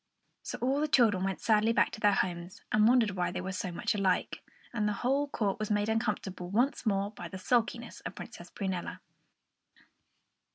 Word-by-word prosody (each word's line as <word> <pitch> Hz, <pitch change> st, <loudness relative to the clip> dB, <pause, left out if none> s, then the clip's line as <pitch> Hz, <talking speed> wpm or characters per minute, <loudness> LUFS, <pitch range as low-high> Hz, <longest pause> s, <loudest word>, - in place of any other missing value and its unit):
So -, -, -5 dB
all 270 Hz, +3 st, +2 dB
the 305 Hz, -, +2 dB
children 225 Hz, -10 st, +4 dB
went 195 Hz, 0 st, -2 dB
sadly 220 Hz, 0 st, +3 dB
back -, -, +3 dB
to -, -, -7 dB
their 205 Hz, -1 st, +4 dB
homes, 180 Hz, 0 st, -2 dB
and 215 Hz, 0 st, +5 dB
wondered 235 Hz, -4 st, +4 dB
why 180 Hz, -2 st, -1 dB
they -, -, -4 dB
were 185 Hz, +1 st, -4 dB
so 190 Hz, -1 st, -3 dB
much 170 Hz, -, -1 dB
alike; 195 Hz, -3 st, 0 dB, 0.3 s
and 210 Hz, -3 st, 0 dB
the 210 Hz, -, +1 dB
whole 280 Hz, +3 st, +2 dB
court 210 Hz, -7 st, -1 dB
was 215 Hz, -, -2 dB
made 205 Hz, 0 st, +1 dB
uncomfortable 210 Hz, -5 st, -2 dB
once 240 Hz, +4 st, +1 dB
more 200 Hz, 0 st, +1 dB
by 175 Hz, -5 st, -8 dB
the 185 Hz, -, -7 dB
sulkiness 235 Hz, +3 st, 0 dB
of -, -, -7 dB
Princess -, -, -9 dB
Prunella. 190 Hz, -3 st, -4 dB
210 Hz, 190 wpm, -31 LUFS, 190-230 Hz, 0.3 s, and